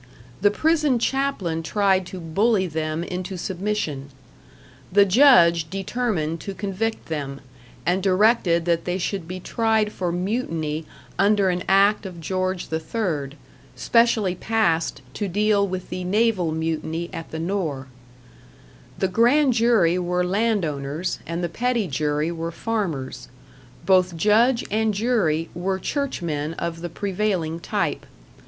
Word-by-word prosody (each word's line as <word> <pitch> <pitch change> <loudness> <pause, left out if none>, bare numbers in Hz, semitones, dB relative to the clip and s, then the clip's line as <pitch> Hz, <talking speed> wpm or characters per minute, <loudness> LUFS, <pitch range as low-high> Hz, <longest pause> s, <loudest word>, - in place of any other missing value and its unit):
The 205 - +5
prison 300 +3 +2
chaplain 235 -10 -1
tried 190 +1 +1
to 185 - -7
bully 190 +5 +1
them 155 -1 -2
into 180 +2 -5
submission. 175 -7 -3 0.8
The 200 +2 +6
judge 180 - +5
determined 190 -5 -2
to 195 +3 -6
convict 205 +3 -3
them, 140 -3 -4 0.5
and 180 +2 +1
directed 185 -3 +3
that 170 -1 +1
they 180 +1 -1
should 190 -2 -3
be 185 +1 -5
tried 220 +2 +1
for 180 -4 -2
mutiny 165 -5 -2 0.3
under 200 -1 +4
an 180 0 -1
act 200 +1 +4
of 175 -2 -9
George 185 +2 -2
III, 160 -4 -2 0.4
specially 225 - +2
passed 170 -8 0
to 205 +8 -3
deal 205 +1 +2
with 185 -1 -5
the 180 0 -3
naval 195 -3 +1
mutiny 160 +1 -2
at 165 - -6
the 160 - -6
Nore. 165 -6 -2 1.1
The 190 - +1
grand 245 +8 +3
jury 225 -7 +3
were 180 0 0
landowners, 180 -7 -1
and 170 +1 -3
the - - +1
petty 235 +2 -1
jury 150 +2 -1
were 165 0 -4
farmers; 165 - -3 0.6
both 185 -2 +3
judge 230 +7 +3
and 215 0 +1
jury 195 -8 +1
were 190 +2 -1
churchmen 170 - -3
of 165 0 -4
the 175 - -4
prevailing 185 -3 -2
type. - - -2
185 Hz, 130 wpm, -23 LUFS, 165-210 Hz, 1.1 s, The